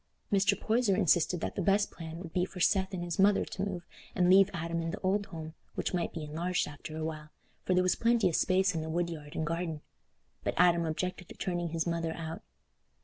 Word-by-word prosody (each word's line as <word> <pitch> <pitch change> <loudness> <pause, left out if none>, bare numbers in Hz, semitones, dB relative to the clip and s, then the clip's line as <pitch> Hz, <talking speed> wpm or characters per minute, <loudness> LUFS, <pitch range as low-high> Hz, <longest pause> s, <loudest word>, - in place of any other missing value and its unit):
Mr. 200 0 +3
Poyser 225 -3 +2
insisted 175 -2 +3
that - - -2
the - - -2
best 200 +2 +2
plan 165 -1 -8
would 170 -2 -8
be 180 - +2
for 185 0 -6
Seth 190 +1 +3
and 180 -2 -3
his 175 0 -4
mother 200 +1 +5
to 190 - -6
move 185 -3 -3 0.3
and 180 -1 +4
leave 195 +1 +7
Adam 170 0 -2
in 165 - -2
the - - -4
old 200 +2 +1
home, 160 -3 -7 0.2
which - - -2
might 175 - 0
be 160 - -5
enlarged 165 +4 -1
after 150 +1 -8
a 160 - -2
while, 155 -1 -5 0.4
for 185 - +2
there 180 - +4
was 185 - +3
plenty 230 -3 +3
of 170 - 0
space 190 0 +3
in 165 - -2
the 160 - -5
woodyard 165 -2 -3
and 160 - -1
garden; 165 -1 -2 0.6
but - - -1
Adam 170 -1 +4
objected 180 +2 -3
to - - -10
turning 175 -2 -2
his 165 0 -1
mother 165 -1 -1
out. 165 -1 -6
175 Hz, 225 wpm, -31 LUFS, 165-190 Hz, 0.6 s, leave